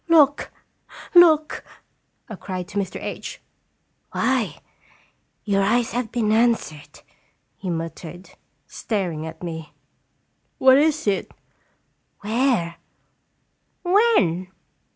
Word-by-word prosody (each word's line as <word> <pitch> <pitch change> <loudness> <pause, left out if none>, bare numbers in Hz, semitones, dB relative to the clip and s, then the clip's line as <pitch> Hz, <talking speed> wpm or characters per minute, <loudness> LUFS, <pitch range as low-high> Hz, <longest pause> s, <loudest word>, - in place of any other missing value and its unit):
" - - -44
Look! 290 -1 +3 0.6
Look! 320 -3 +5 0.3
" - - -48
I 225 - -8
cried 185 -2 -6
to 205 - -2
Mr. 190 -2 -4
H. - - -6 0.7
"Why! - - 0 0.9
Your 200 -2 +1
eyes 235 +4 +2
have 240 -2 -3
been 225 -3 0
answered!" 215 - 0 0.5
he 190 - -6
muttered, 170 +2 -6 0.3
staring 175 -8 -3
at 160 +2 -10
me. 160 -2 -6 0.8
"What 260 +1 +6
is 310 0 +1
it?" 200 -2 0 0.9
"Where?" 220 -6 0 1.1
"When?" 355 - +3
205 Hz, 100 wpm, -23 LUFS, 175-260 Hz, 1.1 s, What